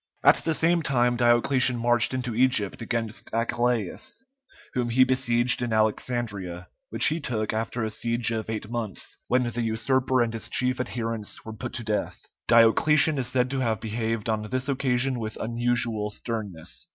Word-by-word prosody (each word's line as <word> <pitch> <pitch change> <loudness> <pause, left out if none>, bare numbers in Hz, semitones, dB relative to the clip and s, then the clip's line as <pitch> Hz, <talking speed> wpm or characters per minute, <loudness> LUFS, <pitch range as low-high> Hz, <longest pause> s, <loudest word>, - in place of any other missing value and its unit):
At - - +7
the 160 -1 -1
same 170 +2 +2
time 120 -5 +2
Diocletian 120 +1 +3
marched 120 0 +3
into 125 -2 -3
Egypt 120 -4 +1
against 115 -1 -3
Achillæus, 120 - -1 0.5
whom 120 -1 -1
he 130 +3 +5
besieged 125 -2 +3
in 120 -2 -2
Alexandria, 105 -5 -1 0.2
which - - +3
he 160 +2 +3
took 110 -8 -2
after 115 +2 -2
a 110 - -2
siege 120 +2 0
of 110 -1 -3
eight 110 -1 -4
months, 115 -4 -4
when 125 +1 +2
the 120 0 -3
usurper 125 +3 +1
and 115 -1 -3
his 115 - -3
chief 125 0 +1
adherents 115 -4 -4
were 110 - -7
put 120 +2 -6
to 120 - -4
death. 105 -1 -3 0.2
Diocletian 140 +6 +4
is 125 - -2
said 125 0 0
to 135 - -1
have 115 -5 0
behaved 115 0 -3
on 110 -1 0
this 130 +2 -2
occasion 130 -2 0
with 110 -1 -5
unusual 115 -2 -1
sternness. 105 -7 -6
120 Hz, 165 wpm, -26 LUFS, 110-125 Hz, 0.5 s, At